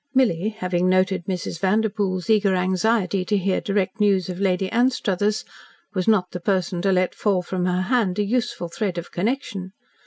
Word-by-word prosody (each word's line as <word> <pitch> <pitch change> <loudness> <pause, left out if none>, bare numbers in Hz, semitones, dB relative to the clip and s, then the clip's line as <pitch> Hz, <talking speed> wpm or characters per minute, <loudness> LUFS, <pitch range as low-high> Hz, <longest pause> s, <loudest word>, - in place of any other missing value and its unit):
Milly, 215 -7 +2
having 185 -4 -1
noted 185 -1 +2
Mrs. 180 -3 -4
Vanderpoel's 195 -2 0
eager 205 -3 +3
anxiety 185 +1 +1
to 205 +2 0
hear 190 0 0
direct 200 +1 -1
news 195 -3 +2
of 180 0 -5
Lady 190 -1 +1
Anstruthers, 215 -4 +1 0.5
was 185 -2 -2
not 195 -5 +3
the 180 - -5
person 180 -1 -1
to 195 +1 +2
let 185 -1 +1
fall 195 -4 0
from 180 0 -2
her 180 +1 +1
hand 210 -4 +1
a 210 - +2
useful 235 -4 -1
thread 180 +2 -3
of 170 - -6
connection. 195 -3 -3
190 Hz, 175 wpm, -23 LUFS, 180-210 Hz, 0.5 s, eager